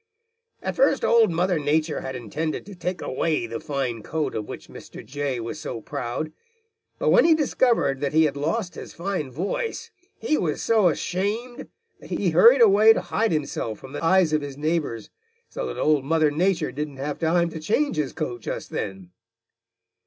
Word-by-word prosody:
"At -, -, -3 dB
first -, -, +3 dB
Old 230 Hz, -2 st, +5 dB
Mother 175 Hz, 0 st, +1 dB
Nature 150 Hz, +1 st, 0 dB
had 130 Hz, 0 st, -5 dB
intended 140 Hz, +7 st, -4 dB
to 205 Hz, -, -10 dB
take 180 Hz, 0 st, -4 dB
away 150 Hz, -1 st, -1 dB
the 115 Hz, 0 st, -5 dB
fine 130 Hz, -6 st, -3 dB
coat 155 Hz, +7 st, -2 dB
of 105 Hz, -1 st, -4 dB
which -, -, -8 dB
Mr. -, -, -11 dB
Jay 140 Hz, -2 st, -3 dB
was 115 Hz, 0 st, -5 dB
so -, -, -5 dB
proud, 120 Hz, +7 st, -4 dB, 0.7 s
but -, -, +1 dB
when -, -, +6 dB
he 330 Hz, -1 st, +6 dB
discovered 245 Hz, -, +1 dB
that 140 Hz, -, 0 dB
he 160 Hz, +1 st, +4 dB
had 150 Hz, -3 st, +1 dB
lost 170 Hz, +7 st, -2 dB
his -, -, -9 dB
fine 175 Hz, -5 st, -3 dB
voice, 450 Hz, -, -3 dB, 0.3 s
he 310 Hz, -9 st, 0 dB
was 155 Hz, -4 st, -1 dB
so 220 Hz, -5 st, +4 dB
ashamed 205 Hz, -, -2 dB, 0.3 s
that -, -, -14 dB
he 185 Hz, -4 st, 0 dB
hurried 230 Hz, +11 st, +7 dB
away 215 Hz, +1 st, +7 dB
to 180 Hz, -, -2 dB
hide 220 Hz, +5 st, 0 dB
himself 140 Hz, -8 st, -2 dB
from 130 Hz, -, -12 dB
the 145 Hz, -, -5 dB
eyes 175 Hz, -1 st, +4 dB
of 155 Hz, -, +2 dB
his 140 Hz, -1 st, -7 dB
neighbors, 150 Hz, -8 st, -2 dB, 0.4 s
so -, -, -4 dB
that -, -, -6 dB
Old 150 Hz, -3 st, +2 dB
Mother 155 Hz, +1 st, +2 dB
Nature 170 Hz, 0 st, +1 dB
didn't 145 Hz, -1 st, -5 dB
have 145 Hz, +2 st, -4 dB
time 170 Hz, +1 st, +2 dB
to 160 Hz, -, -6 dB
change 225 Hz, -, 0 dB
his 150 Hz, -3 st, -1 dB
coat 120 Hz, -1 st, -4 dB
just -, -, -5 dB
then. 95 Hz, -3 st, -5 dB
160 Hz, 185 wpm, -24 LUFS, 140-195 Hz, 0.7 s, hurried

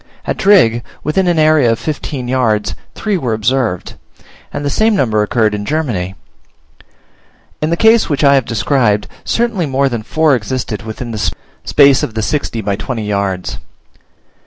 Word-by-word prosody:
At -, -, -1 dB
Drigg, 165 Hz, -, +4 dB, 0.2 s
within 180 Hz, +5 st, +1 dB
an 175 Hz, -2 st, +2 dB
area 155 Hz, -6 st, +4 dB
of 115 Hz, -, 0 dB
fifteen 145 Hz, -3 st, -4 dB
yards, 110 Hz, -7 st, 0 dB, 0.2 s
three 210 Hz, -4 st, -1 dB
were 125 Hz, -7 st, -1 dB
observed, 110 Hz, -3 st, -1 dB, 0.5 s
and 145 Hz, -, -4 dB
the -, -, +1 dB
same 220 Hz, +5 st, +2 dB
number 110 Hz, -, +1 dB
occurred 110 Hz, 0 st, +1 dB
in 105 Hz, 0 st, -3 dB
Germany. 105 Hz, -, -2 dB, 1.5 s
In 155 Hz, -, 0 dB
the 170 Hz, -, 0 dB
case 225 Hz, +2 st, +4 dB
which 145 Hz, 0 st, 0 dB
I 140 Hz, -1 st, +6 dB
have 135 Hz, -3 st, +2 dB
described, 115 Hz, -2 st, +1 dB, 0.2 s
certainly 230 Hz, -8 st, 0 dB
more 135 Hz, 0 st, +1 dB
than 120 Hz, -3 st, -3 dB
four 155 Hz, +6 st, +2 dB
existed 125 Hz, -1 st, -3 dB
within 115 Hz, +2 st, -6 dB
the 110 Hz, -2 st, -1 dB, 0.3 s
space 140 Hz, -2 st, +5 dB
of 110 Hz, -, -4 dB
the 110 Hz, -, -1 dB
sixty 120 Hz, -1 st, -2 dB
by 100 Hz, -1 st, -1 dB
twenty 115 Hz, +1 st, -4 dB
yards. 100 Hz, -3 st, -2 dB
125 Hz, 160 wpm, -15 LUFS, 110-155 Hz, 1.5 s, I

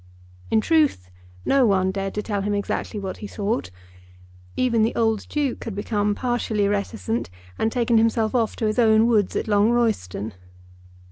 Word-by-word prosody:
In 220 Hz, -, +3 dB
truth 295 Hz, -, +1 dB, 0.3 s
no 275 Hz, -1 st, +4 dB
one 190 Hz, -2 st, +2 dB
dared 195 Hz, 0 st, -4 dB
to 210 Hz, -, -2 dB
tell 205 Hz, -2 st, -2 dB
him 205 Hz, +1 st, -1 dB
exactly 205 Hz, +1 st, -3 dB
what 190 Hz, -2 st, -5 dB
he 210 Hz, -, -7 dB
thought. 205 Hz, -, -2 dB, 0.9 s
Even 235 Hz, -3 st, +2 dB
the 220 Hz, -, +1 dB
old 225 Hz, -2 st, 0 dB
Duke 290 Hz, -4 st, -2 dB
had 225 Hz, -4 st, -5 dB
become 205 Hz, 0 st, -1 dB
partially 230 Hz, -4 st, 0 dB
reticent, 210 Hz, +3 st, -2 dB, 0.3 s
and 220 Hz, -, +1 dB
taken 235 Hz, -2 st, +2 dB
himself 225 Hz, -1 st, +1 dB
off 230 Hz, -4 st, +1 dB
to 225 Hz, -, -2 dB
his 215 Hz, +3 st, 0 dB
own 220 Hz, -1 st, +5 dB
woods 215 Hz, -5 st, +2 dB
at -, -, -1 dB
Long 205 Hz, +1 st, +3 dB
Royston. 210 Hz, -, -1 dB
220 Hz, 165 wpm, -23 LUFS, 205-230 Hz, 0.9 s, own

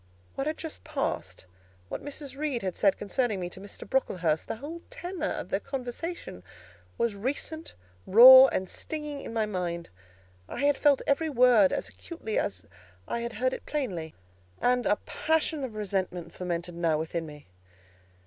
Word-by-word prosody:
What 270 Hz, -, -3 dB
had 310 Hz, -, -1 dB
just 320 Hz, -2 st, -7 dB
passed; 275 Hz, -, -3 dB, 0.4 s
what -, -, -6 dB
Mrs. 285 Hz, -1 st, -6 dB
Reed 280 Hz, -5 st, -2 dB
had 185 Hz, -2 st, -2 dB
said 195 Hz, -2 st, +3 dB
concerning 210 Hz, 0 st, -1 dB
me 175 Hz, -1 st, -4 dB
to 190 Hz, -, -9 dB
Mr. 200 Hz, -, -9 dB
Brocklehurst; 170 Hz, -11 st, 0 dB
the -, -, -3 dB
whole 300 Hz, +8 st, -7 dB
tenor 360 Hz, -9 st, -4 dB
of -, -, -4 dB
their 195 Hz, -, 0 dB
conversation, 265 Hz, -, -5 dB, 0.6 s
was 235 Hz, -2 st, +1 dB
recent, 285 Hz, +9 st, -4 dB, 0.3 s
raw, 260 Hz, +5 st, +11 dB
and 190 Hz, -6 st, -2 dB
stinging 300 Hz, +2 st, -5 dB
in -, -, -7 dB
my 225 Hz, -1 st, +1 dB
mind; 175 Hz, -4 st, -3 dB, 0.6 s
I -, -, -4 dB
had 290 Hz, 0 st, +4 dB
felt 285 Hz, -3 st, +4 dB
every 315 Hz, +3 st, +1 dB
word 245 Hz, -7 st, +5 dB
as -, -, -2 dB
acutely 275 Hz, -11 st, -4 dB
as 200 Hz, -, -3 dB, 0.4 s
I -, -, -2 dB
had 235 Hz, 0 st, -4 dB
heard 255 Hz, +4 st, 0 dB
it -, -, -7 dB
plainly, 185 Hz, -, -3 dB, 0.4 s
and 245 Hz, 0 st, +2 dB
a -, -, +4 dB
passion 315 Hz, -2 st, 0 dB
of 240 Hz, -5 st, -5 dB
resentment 190 Hz, -4 st, -3 dB
fomented 175 Hz, -1 st, -3 dB
now 165 Hz, -2 st, +1 dB
within 160 Hz, +1 st, -3 dB
me. 150 Hz, -1 st, -11 dB
235 Hz, 165 wpm, -28 LUFS, 185-290 Hz, 0.6 s, raw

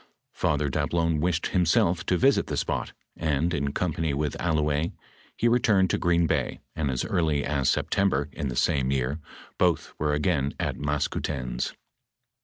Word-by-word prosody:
Father 75 Hz, 0 st, 0 dB
Dablon 80 Hz, +3 st, 0 dB
wished 85 Hz, +1 st, 0 dB
himself 85 Hz, 0 st, +3 dB
to 90 Hz, -, +2 dB
visit 135 Hz, +5 st, +3 dB
the -, -, -3 dB
spot, -, -, -2 dB, 0.2 s
and 80 Hz, +2 st, 0 dB
in 70 Hz, -3 st, -1 dB
company 80 Hz, -2 st, -1 dB
with 75 Hz, 0 st, -1 dB
Al 85 Hz, -2 st, +1 dB
louez, 75 Hz, +2 st, +1 dB, 0.5 s
he 120 Hz, -, +2 dB
returned 110 Hz, -6 st, +3 dB
to -, -, 0 dB
Green 85 Hz, -1 st, +3 dB
bay, -, -, -1 dB, 0.2 s
and 75 Hz, -3 st, -1 dB
as 65 Hz, -1 st, -1 dB
early 80 Hz, -8 st, +1 dB
as 70 Hz, -3 st, +1 dB
September, 95 Hz, -8 st, +1 dB
in 75 Hz, -, -4 dB
the -, -, -4 dB
same 70 Hz, -1 st, +1 dB
year, 70 Hz, +3 st, -1 dB, 0.4 s
both -, -, +1 dB
were 75 Hz, 0 st, +1 dB
again 75 Hz, -2 st, 0 dB
at -, -, -1 dB
Maskoutens. 70 Hz, -3 st, -2 dB
75 Hz, 160 wpm, -26 LUFS, 70-85 Hz, 0.5 s, himself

